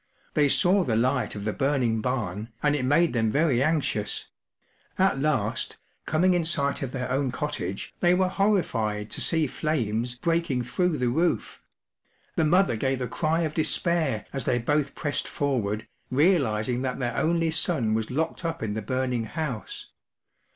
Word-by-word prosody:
They 145 -2 +3
saw 190 +5 +4
the 115 -7 0
light 125 +2 +1
of 105 - -5
the 105 - -1
burning 130 -6 +1
barn, 110 -4 -2
and 145 0 +3
it 145 - -1
made 160 +5 +3
them 115 -2 +1
very 140 -1 +2
anxious; 140 -8 0 0.7
at 190 -7 +2
last, 130 -8 0 0.3
coming 180 +4 +3
in 175 -1 +2
sight 140 -4 0
of 135 -3 -3
their 125 -1 -3
own 135 0 0
cottage, 130 - -4
they 175 0 +4
were 185 0 +2
horrified 115 - 0
to - - -1
see 160 -2 +3
flames 120 -5 -1
breaking 165 -3 0
through 170 +6 0
the 125 -1 +1
roof; 165 +8 0 0.7
the - - +2
mother 175 -3 +3
gave 130 +3 -1
a 125 - -2
cry 160 +4 0
of 155 -2 -1
despair 155 - +1
as 135 -3 -2
they 120 - +2
both 145 +4 0
pressed 145 -2 -2
forward, 110 -7 -1 0.2
realizing 130 - +2
that 130 -1 -2
their 125 -3 -2
only 165 0 +1
son 155 -8 +1
was 110 0 -1
locked 160 +7 -2
up 165 -4 -3
in 105 -2 -2
the 110 - -3
burning 125 +1 -1
house. 135 -3 -5
135 Hz, 165 wpm, -26 LUFS, 120-160 Hz, 0.7 s, saw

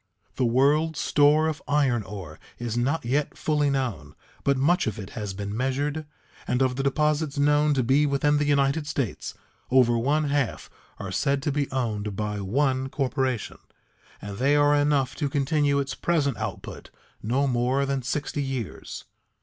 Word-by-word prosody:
The 130 - +2
world's 145 +6 +2
store 150 +2 +4
of 160 -1 -3
iron 135 -5 +2
ore 95 -7 -9 0.2
is 120 -2 -4
not 130 +5 0
yet 140 +5 -1
fully 150 -2 +1
known, 105 - -3 0.3
but 140 -1 +2
much 155 +5 +2
of 110 - -2
it 100 -4 -8
has 105 -4 -5
been 100 +1 -4
measured, 140 +5 -1 0.4
and 125 +2 +2
of 130 -1 0
the 135 - -1
deposits 150 +1 0
known 145 +1 +3
to 130 - +1
be 140 +5 +3
within 145 +1 +2
the 150 - +1
United 145 +1 +1
States 135 -7 -3 0.3
over 125 -2 +4
one 145 +6 +1
half 140 -4 -1 0.3
are 100 -2 -6
said 140 +6 0
to 150 - 0
be 140 0 -1
owned 105 -6 -2
by 105 0 -3
one 130 +5 0
corporation, 130 -4 -2 0.6
and 100 -1 -7
they 140 +3 +3
are 145 0 +4
enough 145 -3 +2
to 145 -3 -1
continue 145 0 +1
its 135 -1 -2
present 145 -4 0
output - - -6 0.3
no 130 +6 +1
more 130 +2 +1
than 135 -1 -1
sixty 145 +3 -2
years. 135 -6 -5
135 Hz, 165 wpm, -25 LUFS, 120-145 Hz, 0.6 s, store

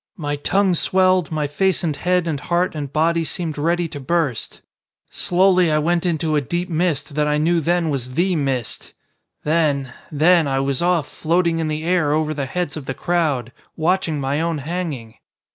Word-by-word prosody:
My 145 -4 -2
tongue 190 +6 +1
swelled, 185 -1 +2
my 155 -2 -1
face 185 +7 0
and 155 -4 0
head 180 +2 0
and 150 -4 -1
heart 175 +5 0
and 145 -3 -5
body 165 +2 +2
seemed 160 -1 -3
ready 170 +3 0
to 150 -2 -7
burst. 140 -3 -2 0.5
Slowly 180 -1 +3
I 150 - +3
went 170 +3 +1
into 160 -2 0
a 150 - +2
deep 175 +6 -3
mist 165 -3 -1
that 150 +1 +1
I 150 0 +1
knew 165 +2 +2
then 170 0 +1
was 130 -2 -4
the 180 +3 +2
mist, 135 -6 -2 0.5
then 145 -5 +1 0.2
then 160 +2 +4
I 135 -1 0
was 135 +1 -1
off 170 -4 +1
floating 170 0 0
in 160 - -1
the 155 0 -3
air 170 -4 +2
over 155 0 0
the 140 -3 -3
heads 180 +5 -3
of 150 -4 -7
the 135 - -3
crowd, 150 -9 0 0.3
watching 165 -2 0
my 140 +3 -1
own 165 -1 -1
hanging! 150 -7 -5
160 Hz, 185 wpm, -21 LUFS, 145-175 Hz, 0.5 s, then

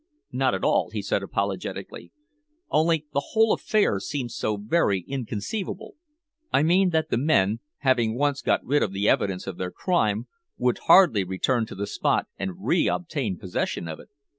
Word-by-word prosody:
"Not - - +1
at - - -5
all," - - +2
he - - -4
said - - 0
apologetically. - - -4 0.6
"Only 160 0 +2
the 140 - +1
whole 220 -1 +4
affair 205 - +1
seems 130 -1 -4
so 105 -1 -1
very 100 - +1
inconceivable 135 - -5 0.6
I 140 - +3
mean 180 +4 +4
that 160 -2 0
the 115 - +2
men, 115 -7 +2 0.2
having 120 -4 +2
once 145 0 0
got - - +1
rid 145 +3 +2
of 95 - -1
the 100 +2 0
evidence 95 -2 +1
of 95 -3 -6
their 90 - -2
crime, 110 - 0 0.3
would 125 0 +1
hardly 170 - +7
return 110 +6 0
to - - -9
the 100 +1 -3
spot - - 0
and 95 +1 -5
re 170 +7 +3
obtain 140 - -2
possession 90 -2 -3
of 80 -1 -6
it." - - -15
125 Hz, 170 wpm, -25 LUFS, 100-160 Hz, 0.6 s, hardly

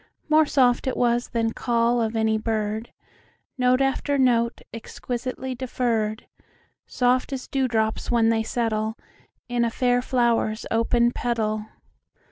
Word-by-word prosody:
More 310 0 +5
soft 250 -2 +2
it 260 - -1
was 240 0 +1
than 225 -1 -1
call 235 0 +1
of 225 0 -1
any 220 0 +2
bird, 220 0 -2 0.6
Note 255 0 +2
after 270 +1 0
note, 235 -3 +2
exquisitely 250 +3 -5
deferr'd, 235 -3 -2 0.6
Soft 250 +1 +1
as 265 -2 -5
dew 265 -1 0
drops 220 -2 -1
when 230 -2 +3
they 225 -1 +2
settleIn 220 -1 -1 0.7
a 235 - +1
fair 245 +1 +1
flower's 235 -3 0
open 235 +1 +2
petal. 215 -3 -2
235 Hz, 125 wpm, -24 LUFS, 225-250 Hz, 0.7 s, More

